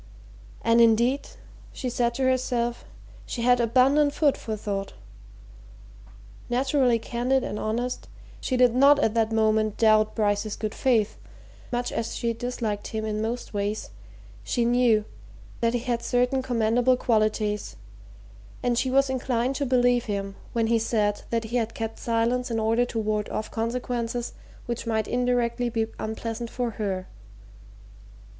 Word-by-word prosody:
And 230 +1 +4
indeed, 235 +4 +3 0.5
she 260 - -4
said 240 -1 0
to 265 - -1
herself, 250 -2 0 0.4
she 235 - -3
had 245 0 +4
abundant 270 +5 +3
food 290 -3 +3
for 220 -1 -5
thought. 200 -1 -4 1.6
Naturally 255 0 +2
candid 245 +3 0
and 210 - -4
honest, 240 +3 -2 0.3
she 255 - -1
did 250 -2 +5
not 280 +3 +6
at 225 -7 +1
that 225 -1 +1
moment 220 -1 +2
doubt 215 -1 +4
Bryce's 210 -1 0
good 215 -1 -4
faith; 230 -6 +1 0.5
much 245 0 -1
as 230 - -3
she 235 -1 -1
disliked 230 -3 -3
him 220 -1 -3
in 215 0 -2
most 230 +2 -4
ways 205 - -2 0.5
she 235 - 0
knew 235 -3 +3 0.5
that 230 0 +1
he - - +1
had 240 -1 -1
certain 250 +2 +1
commendable 245 0 +2
qualities, 215 -3 0 0.9
and 240 -1 +2
she 260 - 0
was 275 +1 +3
inclined 255 0 -1
to 280 - -1
believe 245 -1 +3
him 195 -2 -3 0.2
when 230 -1 +1
he 230 0 +2
said 210 -2 0
that 230 -1 0
he 230 +2 -2
had 230 -1 -2
kept 225 -1 -4
silence 235 +2 0
in 230 -1 -1
order 225 +2 +2
to 235 - -6
ward 215 -1 -1
off 215 - -4
consequences 235 +1 -2 0.3
which 235 -1 -4
might 220 -2 0
indirectly 245 -1 0
be 225 -1 0
unpleasant 225 +1 -4
for 245 -1 -2
her. 195 -3 -3
235 Hz, 150 wpm, -26 LUFS, 220-245 Hz, 1.6 s, not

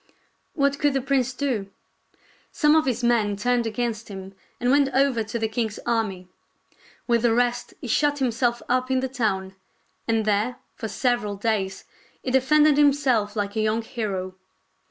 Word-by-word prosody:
What 280 -1 +1
could 290 -2 +2
the - - +3
prince 265 -1 +1
do.? 250 -7 -2 0.8
Some 300 -1 +3
of 315 -3 +3
his 250 -1 -1
men 225 -4 +2
turned 240 +2 0
against 225 0 -3
him 195 -1 -8 0.3
and 245 +1 +1
went 280 -1 +4
over 265 -4 +3
to 220 +2 -4
the 225 -1 0
king's 220 -1 -2
army. 215 -6 -1 0.8
With 235 -2 +2
the 230 -1 +3
rest 245 0 0
he - - -6
shut 290 +5 +2
himself 240 -2 0
up 255 +1 +1
in 260 -1 +1
the 265 - -1
town, 205 -7 -2 0.5
and 225 -2 +1
there, 215 +4 +1 0.2
for 225 - -5
several 240 -3 -1
days, 195 -2 -2 0.4
he 255 - -2
defended 295 +3 +4
himself 270 -8 +3
like 205 -1 -2
a 220 - +1
young 215 +1 0
hero. 195 -5 -4
235 Hz, 165 wpm, -24 LUFS, 215-260 Hz, 0.8 s, went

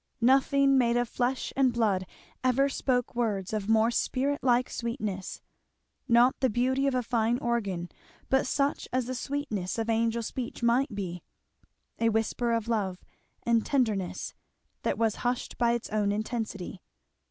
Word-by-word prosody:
Nothing 275 +2 +4
made 235 -1 +3
of 245 0 +1
flesh 250 +3 -1
and 270 -2 +4
blood 205 -6 +1 0.4
ever 260 +2 +3
spoke 250 -2 0
words 215 -5 -1
of 210 -1 -2
more 225 +1 +4
spirit 275 +4 0
like 250 0 +3
sweetness, 215 -6 -4 0.7
not 240 +1 +5
the 260 - +2
beauty 260 +4 +1
of 270 - +1
a 250 - +1
fine 235 0 +1
organ, 200 -8 -1 0.4
but 265 -1 +2
such 280 +2 0
as 255 -1 0
the 255 - -3
sweetness 255 -9 -3
of 225 0 0
angel 230 +1 +1
speech 240 +1 -5
might 235 0 +2
be; 180 -3 -4 0.8
a 230 - +3
whisper 225 +2 0
of 230 -1 0
love 200 -6 -1 0.4
and 230 -1 +2
tenderness 220 -9 -1 0.5
that - - -1
was 225 -2 +1
hushed 245 0 -2
by 235 -1 +3
its 235 - -2
own 210 -1 +1
intensity. 215 -3 -4
235 Hz, 155 wpm, -28 LUFS, 215-255 Hz, 0.8 s, not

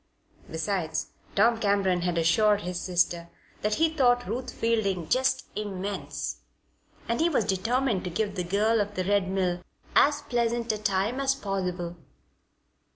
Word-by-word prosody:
Besides, 160 0 -2 0.2
Tom 230 +3 +4
Cameron 200 -4 +2
had 175 -1 -1
assured 205 +6 +3
his 180 -1 -4
sister 175 -1 0 0.3
that 210 0 +1
he 325 - +4
thought 250 -6 +2
Ruth 240 +6 -3
Fielding 200 -7 0
"just 260 +1 +2
immense," 200 -1 -4 0.7
and 235 - 0
he 335 - +4
was 260 -10 +1
determined 225 +2 0
to - - -2
give 205 +3 -1
the 185 -2 -2
girl 210 +5 +2
of 205 0 -4
the 185 - 0
Red 200 -1 +2
Mill 180 -2 0 0.3
as 290 0 +4
pleasant 235 -2 0
a 215 - -3
time 200 +5 0
as 275 0 +2
possible. 180 -6 -3
205 Hz, 150 wpm, -27 LUFS, 185-235 Hz, 0.7 s, Tom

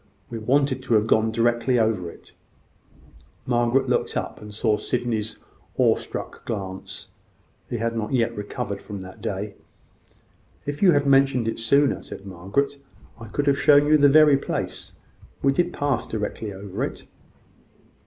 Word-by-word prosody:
We 115 - -4
wanted 130 +3 +1
to 125 -3 +1
have 105 0 +3
gone 110 0 +3
directly 120 +2 +2
over 110 -6 +1
it." - - -15 1.1
Margaret 120 +2 +2
looked - - 0
up, - - -4
and 105 0 -9
caught 105 0 0
Sydney's 115 -3 -2 0.4
awe - - +5
struck - - -7
glance. 95 -4 -5 0.6
He 120 - -2
had 115 +1 -1
not 110 -2 -3
yet 115 -3 +1
recovered 100 -1 -4
from 100 -2 -7
that 95 0 -11
day. 100 +1 -3 1.1
"If 145 0 -4
you 185 -4 +6
had 145 0 +2
mentioned 135 -3 +4
it 115 - -2
sooner," 140 +5 +3
said 100 - -10
Margaret, 100 +10 -2 0.4
"I 115 - -9
could 145 +7 -2
have 140 -1 +3
shown 145 0 +6
you 155 +1 +5
the 145 -1 +6
very 150 -1 +7
place. - - -4 0.5
We 135 0 +4
did 175 +4 +1
pass 145 -6 -1
directly 105 0 -4
over 95 0 -5
it." - - -5
115 Hz, 155 wpm, -24 LUFS, 105-140 Hz, 1.1 s, very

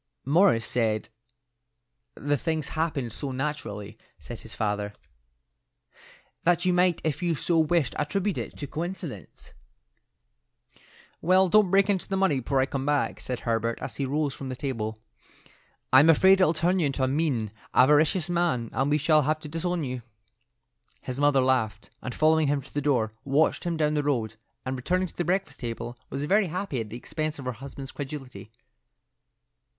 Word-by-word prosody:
"Morris 150 - +4
said 110 -3 0 1.1
the 145 +1 0
things 160 0 -2
happened 155 -8 -2
so 140 - -4
naturally," 115 -7 -4 0.2
said 120 - -9
his 115 - -10
father, 105 -1 -2 1.5
"that 175 +1 +2
you 180 - +3
might 180 -1 +3
if 155 +2 -1
you 170 -2 +1
so 165 +3 +1
wished 160 -4 +2
attribute 190 +7 -1
it - - -6
to 145 - -4
coincidence." 160 - -6 1.7
"Well, 185 +2 +4
don't 210 0 +5
break 195 +1 +4
into 195 -3 0
the 195 - -1
money 180 -8 +2
before 135 +2 0
I - - +3
come 135 0 -3
back," 145 0 0
said 125 -2 -4
Herbert 115 0 -1
as - - -6
he 140 - -1
rose 145 +1 -1
from 135 -1 -7
the 130 - -4
table. 115 -5 -3 1.0
"I'm 140 +5 +8
afraid 190 +4 +6
it'll 180 - +5
turn 180 +4 +2
you 160 - +2
into 135 -1 -2
a - - +3
mean, 130 -7 0 0.2
avaricious 150 +6 +4
man, 170 -10 0
and 135 +2 +1
we 150 - +3
shall 155 +1 +4
have 155 +2 +1
to 155 - -7
disown 165 +2 -2
you." 130 -2 -4 1.0
His 130 +1 -4
mother 145 -2 +4
laughed, 115 -4 0
and 130 - -5
following 155 0 +3
him 140 -1 0
to - - -16
the 145 - -1
door, 120 -7 +1
watched 145 +5 +1
him 170 -1 -1
down 150 -1 +1
the 150 - +1
road; 120 -7 -1 0.3
and 130 0 -2
returning 180 +8 0
to - - -17
the 175 - -1
breakfast 190 +3 -1
table, 120 0 -5
was 140 +2 -3
very 195 +5 +3
happy 175 -7 -3
at 110 - -7
the 115 - -6
expense 155 +4 -4
of 135 - -8
her 125 - -1
husband's 135 +2 -8
credulity. 135 -8 -7
145 Hz, 175 wpm, -27 LUFS, 125-165 Hz, 1.7 s, I'm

